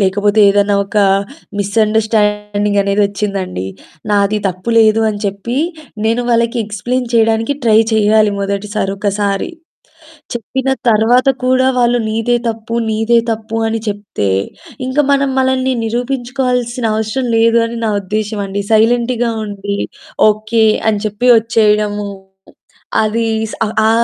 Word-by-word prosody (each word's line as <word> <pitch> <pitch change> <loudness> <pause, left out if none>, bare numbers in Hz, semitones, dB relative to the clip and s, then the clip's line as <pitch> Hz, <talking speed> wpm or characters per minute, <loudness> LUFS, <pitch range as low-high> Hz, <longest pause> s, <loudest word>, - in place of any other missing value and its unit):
లేకపోతే 205 +2 +2
ఏదన్నా 205 0 +2
ఒక 200 +2 -8 0.6
మిస్‌అండర్స్టాండింగ్ 210 -1 +1
అనేదొచ్చిందండి. 200 - -1 0.4
నాది 205 +1 +2
తప్పు 185 +5 -5
లేదు 220 0 +4
అని 205 -1 -6
చెప్పి 200 +5 -4 0.5
నేను 230 +2 +1
వాళ్ళకి 235 +1 +1
ఎక్స్ప్లేన్ 245 +4 -3
చేయడానికి 225 +3 +2
ట్రై 220 -1 +5
చేయాలి, 215 -1 +3
మొదటిసారి 200 0 -2
ఒకసారి. 200 - -1 0.8
చెప్పిన 260 +3 -3 0.2
తరువాత 235 +4 +3 0.2
కూడా 260 0 +3
వాళ్ళు 245 0 +3
"నీదే 225 +2 0
తప్పు, 225 0 -5 0.2
నీదే 225 +2 +2
తప్పు" 225 0 -4
అని 225 0 -1
చెప్తే 200 - -3 0.6
ఇంకా 265 +3 +1
మనం 280 0 +2
మనల్ని 260 0 +1
నిరూపించుకోవాల్సిన 245 0 -2
అవసరం 220 +4 -2
లేదు 230 +1 +4
అని 235 +1 -6
నా 220 - +1
ఉద్దేశ్యం 210 +2 -3
అండి. 200 +1 -3
సైలెంట్‌గా 235 +2 +2
ఉండి, 200 -1 -4 0.5
"ఓకె" 215 +1 +1 0.2
అని 210 -2 -2
చెప్పి 215 +4 -1
వచ్చేయడము 210 -2 +1 0.9
అది 225 +2 0 0.2
స్ - - -7 0.3
ఆ - - +4
220 Hz, 115 wpm, -15 LUFS, 205-235 Hz, 0.9 s, ట్రై